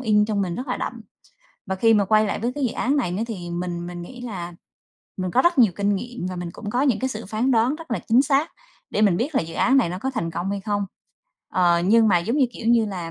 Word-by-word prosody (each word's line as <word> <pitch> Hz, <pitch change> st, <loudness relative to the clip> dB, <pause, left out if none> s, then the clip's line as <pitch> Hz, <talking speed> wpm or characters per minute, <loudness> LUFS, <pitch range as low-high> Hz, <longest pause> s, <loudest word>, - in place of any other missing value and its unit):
in 210 Hz, -4 st, +3 dB
trong 210 Hz, -2 st, -1 dB
mình 180 Hz, -3 st, -2 dB
rất 255 Hz, +8 st, -5 dB
là -, -, -1 dB
đậm. -, -, -5 dB, 0.7 s
Và 190 Hz, -, -1 dB
khi 225 Hz, +4 st, +4 dB
mà 205 Hz, -2 st, +3 dB
quay 215 Hz, +2 st, +3 dB
lại 205 Hz, -, -2 dB
với 240 Hz, +2 st, -1 dB
cái 285 Hz, -2 st, -2 dB
dự 235 Hz, -, -3 dB
án 275 Hz, +4 st, 0 dB
này 230 Hz, -11 st, 0 dB
nữa 200 Hz, +5 st, -2 dB
thì 180 Hz, -7 st, -6 dB
mình 175 Hz, 0 st, -4 dB
mình 175 Hz, 0 st, -7 dB
nghĩ 245 Hz, +8 st, -10 dB
là 185 Hz, -8 st, -6 dB, 0.6 s
mình 185 Hz, -1 st, -3 dB
có 255 Hz, -, +3 dB
rất 345 Hz, -3 st, +2 dB
nhiều 225 Hz, -7 st, +6 dB
kinh 200 Hz, 0 st, +1 dB
nghiệm 240 Hz, -3 st, -6 dB
và 185 Hz, -, -4 dB
mình 175 Hz, -1 st, -5 dB
cũng 205 Hz, -, -7 dB
có 245 Hz, +4 st, +1 dB
những 265 Hz, -6 st, +2 dB
cái 260 Hz, -, 0 dB
sự 220 Hz, -5 st, -6 dB
phán 220 Hz, +6 st, 0 dB
đoán 240 Hz, +3 st, +3 dB
rất 330 Hz, -3 st, -12 dB
là 235 Hz, -, 0 dB
chính 240 Hz, +4 st, +5 dB
xác 285 Hz, +3 st, +1 dB, 0.4 s
để 210 Hz, -, 0 dB
mình 195 Hz, -5 st, +4 dB
biết 280 Hz, -, -2 dB
là -, -, +3 dB
dự 165 Hz, 0 st, -8 dB
án 260 Hz, +9 st, +3 dB
này 255 Hz, -, +3 dB
nó 180 Hz, +2 st, -4 dB
có 265 Hz, +7 st, -2 dB
thành 170 Hz, -10 st, -3 dB
công 175 Hz, +4 st, -3 dB
hay 200 Hz, 0 st, -2 dB
không. 205 Hz, 0 st, -1 dB, 0.6 s
Ờ, 175 Hz, -2 st, +2 dB
nhưng 225 Hz, +2 st, +5 dB
mà 180 Hz, -, +4 dB
giống 220 Hz, +10 st, -1 dB
như, 275 Hz, -3 st, +4 dB
kiểu 225 Hz, -, -7 dB
như 230 Hz, -1 st, +4 dB
là, 180 Hz, -5 st, -5 dB
215 Hz, 285 wpm, -23 LUFS, 180-245 Hz, 0.7 s, nhiều